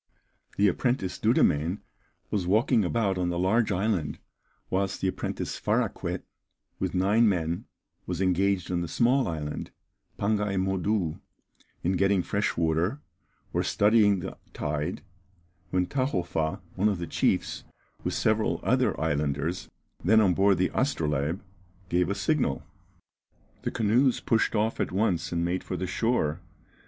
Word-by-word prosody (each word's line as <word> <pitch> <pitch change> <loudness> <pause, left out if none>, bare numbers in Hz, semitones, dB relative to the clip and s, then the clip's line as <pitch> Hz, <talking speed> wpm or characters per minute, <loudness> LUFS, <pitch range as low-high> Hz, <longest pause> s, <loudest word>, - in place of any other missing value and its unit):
The 100 - +5
apprentice 100 -1 0
Dudemaine 80 +6 +2 0.5
was 95 -4 -1
walking 110 +3 +3
about 95 -1 0
on 90 -1 0
the 85 - -2
large 105 +6 +2
island, 95 -5 0 0.5
whilst 95 +1 0
the 95 - 0
apprentice - - -4
Faraquet, - - -1 0.6
with - - -2
nine 105 +5 +4
men, 85 -3 -1 0.4
was 90 -2 -3
engaged 95 0 +1
on 90 -1 0
the 85 - -3
small 125 - +2
island, 75 -3 -4 0.5
Pangaï 105 -1 0
Modou, 95 -2 0 0.6
in 90 - +2
getting 95 0 +2
fresh 100 +4 -1
water, 85 - +1 0.5
or - - +2
studying 105 -2 +3
the - - -7
tide, 75 +4 -3 0.7
when 90 -1 +1
Tahofa, 90 - -1
one 100 +3 +2
of 100 - -1
the 85 - -4
chiefs, - - 0 0.4
with - - -1
several - - +1
other - - +2
islanders, 75 -1 -1 0.3
then 110 +5 +5
on 100 -4 +4
board 95 +1 +4
the 90 - +1
Astrolabe, 80 - 0 0.5
gave 90 +1 +2
a 100 - 0
signal. 100 - 0 1.0
The - - -1
canoes 120 +4 +2
pushed 115 0 +1
off 110 +2 0
at - - -1
once 90 -4 0
and 85 0 0
made 90 +2 -1
for 90 - -4
the 95 - -2
shore. 95 -5 0
95 Hz, 140 wpm, -27 LUFS, 85-105 Hz, 1.0 s, The